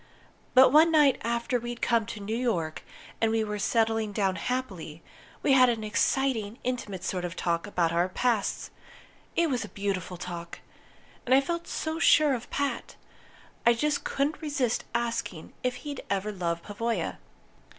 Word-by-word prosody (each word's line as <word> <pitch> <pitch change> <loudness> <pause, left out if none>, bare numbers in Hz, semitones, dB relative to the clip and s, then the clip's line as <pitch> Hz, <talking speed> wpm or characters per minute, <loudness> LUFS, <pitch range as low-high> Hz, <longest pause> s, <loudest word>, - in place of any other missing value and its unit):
But 260 0 +8
one 315 +3 +6
night 295 -4 +5
after 235 +2 0
we'd 240 0 -6
come 230 -2 +1
to 230 -2 -6
New 210 +2 -3
York 180 -11 -1 0.4
and 225 - +3
were 215 -2 -1
settling 225 0 +1
down 195 -2 +1
happily, 185 -7 -4 0.4
we - - +3
had 255 -1 +7
an 225 -2 -1
exciting, 225 0 0
intimate 215 -7 -3
sort 180 -2 -2
of 175 0 -4
talk 170 +1 -1
about 175 -5 +1
our 175 +2 +2
pasts. 225 +1 0 0.6
It 335 0 +3
was 245 -4 0
a 210 - -8
beautiful 195 -3 -3
talk! 170 -1 -7 0.6
And 255 - +4
I - - +7
felt 340 +4 -3
so 315 +1 -3
sure 305 -3 +5
of 245 -1 -5
Pat, 280 0 -2 0.7
I 235 - +6
just 295 +5 0
couldn't 285 +4 -1
resist 285 -6 -1
asking 230 -8 -3
if 250 0 -1
he'd 285 +1 -6
ever 200 +1 -1
loved 170 -3 -2
Pavoya. 230 +3 -2
230 Hz, 160 wpm, -28 LUFS, 195-255 Hz, 0.7 s, But